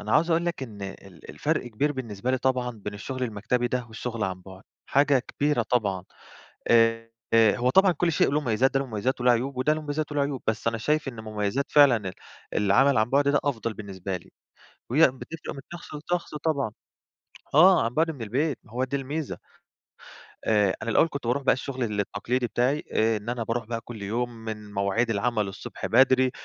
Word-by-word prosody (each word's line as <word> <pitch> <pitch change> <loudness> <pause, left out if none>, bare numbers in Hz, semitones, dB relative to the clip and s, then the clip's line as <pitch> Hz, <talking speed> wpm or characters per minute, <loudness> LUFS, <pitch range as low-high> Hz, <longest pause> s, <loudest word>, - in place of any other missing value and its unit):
أنا 105 +1 -3
عاوز 165 +5 +3
أقول 170 +1 +2
لك 170 -5 -2
إن 105 -6 -8
ال 95 -3 -9
الفرق - - -1
كبير 130 +6 0
بالنسبة 120 -3 -4
لي 130 - +1
طبعًا 125 -1 0
بين 105 -3 -7
الشُغل 130 +5 -5
المكتبي 120 +2 -1
ده 125 0 -1
والشُغل 115 0 -4
عن 95 -1 -4
بُعد، 95 0 -12 0.2
حاجة 140 0 +4
كبيرة 140 +1 0
طبعًا. 105 -6 0 0.6
آآ، 115 0 +4 0.3
هو 115 +2 +4
طبعًا 190 +5 +5
كل 170 +1 0
شيء - - +3
له 145 +2 +1
مميزات، 125 0 +2
ده 135 - +3
له 135 - -3
مميزات، 120 +3 -2
وله 125 0 +5
عيوب 130 +3 -1
وده 130 +4 +2
له 155 - -1
مميزات، 150 0 -3
وله 145 - 0
عيوب. 140 -2 -2
بس 110 +1 0
أنا 115 0 -2
شايف 150 +4 0
إن 120 -4 -7
مميزات 110 +5 -2
فعلًا 145 -4 +7
ال - - -6 0.4
العمل 125 +7 +4
عن 110 +2 +1
بُعد 140 +1 +3
ده 145 0 +4
أفضَل 115 -5 -1
بالنسبة 95 -2 -5
لي. 85 - -13 0.6
وهي 135 +7 +2
بتفرِق 155 +5 -8
من 135 - -8
شخص 175 - -9
لشخص 170 +2 -3
طبعًا، 145 -6 -1 0.8
آه، 180 0 +7
عن 115 +1 -2
بُعد 160 +3 +2
من 140 -7 -7
البيت، 130 +5 -1
ما 110 - -19
هو 125 +2 0
دي 130 +2 -2
الميزة. 140 +2 -4 1.1
آآ، 105 -3 +3
أنا 110 - -3
الأول 165 - +4
كنت 140 -5 -5
باروح 130 +4 0
بقى 130 - +5
الشُغل 130 0 -4 0.2
التقليدي 120 +5 -1
بتاعي. 130 +6 0
آآ 110 0 +2
إن 105 +2 -7
أنا 120 -1 -2
باروح 115 +1 -2
بقى 115 0 -4
كل 115 -2 -9
يوم، 115 +5 -1
من 110 -3 -8
مواعيد 100 +4 +1
العمل 110 -1 0
الصبح 95 - -7
بدري، 130 +1 +4
125 Hz, 200 wpm, -26 LUFS, 110-140 Hz, 1.1 s, فعلًا